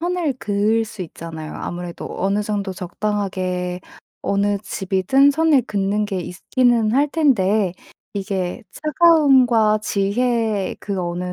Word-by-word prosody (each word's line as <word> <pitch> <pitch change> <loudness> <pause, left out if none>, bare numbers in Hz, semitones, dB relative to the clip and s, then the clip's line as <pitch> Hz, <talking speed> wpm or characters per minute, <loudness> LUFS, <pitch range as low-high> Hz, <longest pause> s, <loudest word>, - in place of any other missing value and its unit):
선을 345 -4 -1
그을 215 +2 +1
수 210 -3 -7
있잖아요. 160 -2 -8
아무래도 175 0 -6
어느 200 +2 +1
정도 205 -2 -2
적당하게 185 -1 -3 0.4
어느 200 0 +1
집이든 195 +8 +2
선을 305 -3 +3
긋는 205 +1 0
게 195 -3 -3
있기는 230 +5 +1
할 285 +3 +3
텐데 215 - +2 0.4
이게 195 +1 -3
차가움과 270 -9 +4
지혜 215 0 0
그 200 -2 -3
어느 180 +1 -3
205 Hz, 255 characters per minute, -20 LUFS, 185-245 Hz, 0.4 s, 차가움과